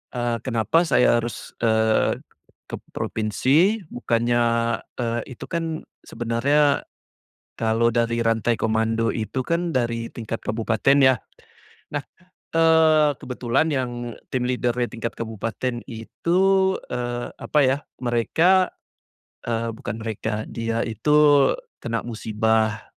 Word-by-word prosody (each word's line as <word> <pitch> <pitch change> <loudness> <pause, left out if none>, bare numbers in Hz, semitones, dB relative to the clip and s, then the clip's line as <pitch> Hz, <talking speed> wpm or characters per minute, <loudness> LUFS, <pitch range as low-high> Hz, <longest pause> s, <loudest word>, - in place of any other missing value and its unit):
eee, 120 -1 0
kenapa 115 - +2
saya 120 -4 +4
harus, 120 -1 -7
eee, 110 -1 +2 0.5
ke - - -5 0.2
provinsi? 145 - +1
Bukannya, 120 0 +1 0.6
eee, 120 -1 -1 0.2
itu - - -7
kan 165 -2 -2 0.3
sebenernya 135 +6 +1 0.8
kalo 115 +1 +2
dari 115 0 +1
rantai 115 +1 +1
komando 115 +1 +1
itu 115 +3 -3
kan 170 +3 -1
dari 115 -2 0
tingkat 115 -1 -5
kabupaten 115 +4 +1
ya. 130 -1 +6 0.8
Nah, 145 - -1 0.5
eee, 160 -2 +5
kebetulan 125 +3 0
yang 130 -3 -1 0.4
team 125 -1 -1
leader-nya 125 -1 0
tingkat 115 0 -5
kabupaten 115 +2 -3
itu, 170 +10 -1 0.5
eee, 120 0 -3
apa 150 - +1
ya, 130 +2 +2 0.3
mereka 165 +11 +3 0.8
eee, 115 -1 -2
bukan 110 - -6
mereka, 110 -1 -3
dia 115 0 -2
itu 115 +6 -4 0.7
kena 115 -1 -3
musibah, 110 -1 0
120 Hz, 110 wpm, -23 LUFS, 115-130 Hz, 0.8 s, ya